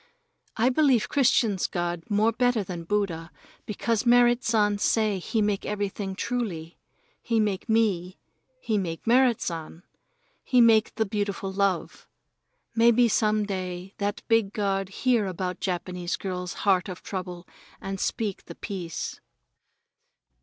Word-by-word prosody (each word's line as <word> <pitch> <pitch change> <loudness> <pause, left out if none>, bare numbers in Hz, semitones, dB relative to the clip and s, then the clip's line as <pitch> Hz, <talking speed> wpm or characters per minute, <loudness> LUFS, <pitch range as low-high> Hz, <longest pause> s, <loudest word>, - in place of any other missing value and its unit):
I 235 +3 +3
believe 260 -5 +3
Christians' 235 -8 +2
God 175 -1 -2
more 215 +2 +3
better 245 -2 +1
than 175 -3 -6
Buddha, 170 -4 -1 0.4
because 220 +1 -1
Merrit 240 0 +4
San 210 -2 +2
say 215 -2 +1
he 215 +4 -1
make 205 -1 0
everything 200 -1 -3
truly. 185 -9 -4 0.4
He 230 -2 0
make 210 0 -1
me, 195 -5 +1 0.4
he 220 - 0
make 165 -4 -4
Merrit 245 0 +4
San, 165 0 -5 0.6
he 250 - +2
make 225 -2 +5
the 220 0 +1
beautiful 200 -1 -3
love. 195 -2 -1 0.7
Maybe 235 +1 +5
some 215 -1 +2
day 185 -1 -5
that 205 0 -2
big 225 -3 +2
God 195 -2 -1
hear 230 0 +1
about 185 0 -4
Japanese 180 -1 -3
girl's 180 -2 -4
heart 195 -1 +3
of 185 - -8
trouble 180 -2 -6 0.3
and 195 0 -5
speak 210 -1 -2
the 170 - -10
peace. 180 -5 -5
205 Hz, 130 wpm, -26 LUFS, 185-225 Hz, 0.7 s, make